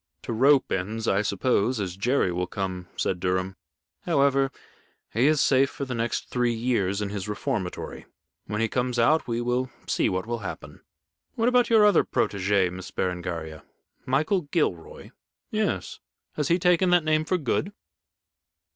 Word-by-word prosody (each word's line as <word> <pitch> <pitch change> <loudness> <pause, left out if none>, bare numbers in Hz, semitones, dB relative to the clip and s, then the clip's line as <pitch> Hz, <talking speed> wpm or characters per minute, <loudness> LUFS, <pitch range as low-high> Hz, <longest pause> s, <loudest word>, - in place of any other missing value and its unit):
"To - - -4
rope 135 +4 +4
ends, 110 +5 -2
I 95 - +3
suppose, 110 +3 +1
as 95 -3 -3
Jerry 110 -1 +1
will 90 +1 -2
come," 95 -2 -4
said 90 - -1
Durham. 95 +1 -1 0.5
"However, 140 -1 +3 0.6
he 120 +5 +3
is 155 -1 +3
safe 135 0 +4
for 140 - -5
the 130 - -4
next 115 0 -2
three 120 -1 0
years 105 -4 0
in 100 - -3
his 100 -1 -4
reformatory. 105 -4 -4 0.4
When 105 +1 -2
he 115 - +2
comes 125 +1 -1
out, 150 +7 +3
we 120 0 -1
will 125 +2 -1 0.2
see - - +1
what 95 +1 -2
will 120 0 -3
happen. 100 - -8 0.5
What 230 +1 +2
about 250 -1 +3
your 220 -2 +6
other 205 - +5
protégé, 95 -2 +1
Miss 95 0 -8
Berengaria." 85 -4 -4 0.4
"Michael 155 +9 +1
Gilroy?" 90 - -2 0.4
"Yes. - - -2 0.3
Has 150 -2 -1
he 170 - +3
taken 180 0 +3
that 175 -2 +4
name 155 0 +2
for 185 +4 0
good?" 160 - -1
115 Hz, 160 wpm, -26 LUFS, 95-140 Hz, 0.6 s, your